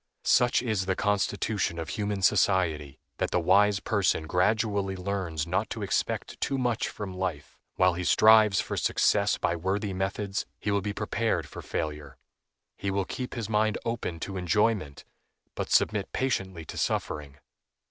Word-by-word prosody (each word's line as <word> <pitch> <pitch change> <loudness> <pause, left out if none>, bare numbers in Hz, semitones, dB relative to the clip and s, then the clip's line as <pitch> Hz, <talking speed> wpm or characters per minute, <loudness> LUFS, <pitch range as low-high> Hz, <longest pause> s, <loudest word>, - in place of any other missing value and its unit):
Such 120 0 +4
is 105 -6 -1
the 95 - +1
constitution 100 -2 0
of 80 -2 -5
human 100 +3 -2
society, 80 -9 +2 0.2
that - - 0
the - - +1
wise 100 +4 +4
person 100 -6 +1
gradually 100 +2 +1
learns 90 -5 -3
not 85 +2 -1
to - - -4
expect - - -2
too 135 - 0
much 120 -3 0
from 100 -3 -6
life; 90 -6 -4 0.2
while 90 -1 +4
he 90 +1 -4
strives 110 0 +6
for - - -2
success - - +2
by 85 - 0
worthy 95 +4 -2
methods, 95 +1 -2
he 105 - -2
will 100 0 +1
be 105 +1 -3
prepared - - -1
for - - -9
failure. 75 -3 -5 0.6
He 100 - -3
will 95 0 0
keep 125 +6 -5
his 115 -4 -3
mind 110 0 +1
open 115 -8 -3
to 95 -1 -4
enjoyment, 90 -4 0 0.5
but - - -4
submit 105 -2 +2
patiently 95 -10 -2
to - - -6
suffering. 70 -2 -2
95 Hz, 160 wpm, -28 LUFS, 90-105 Hz, 0.6 s, strives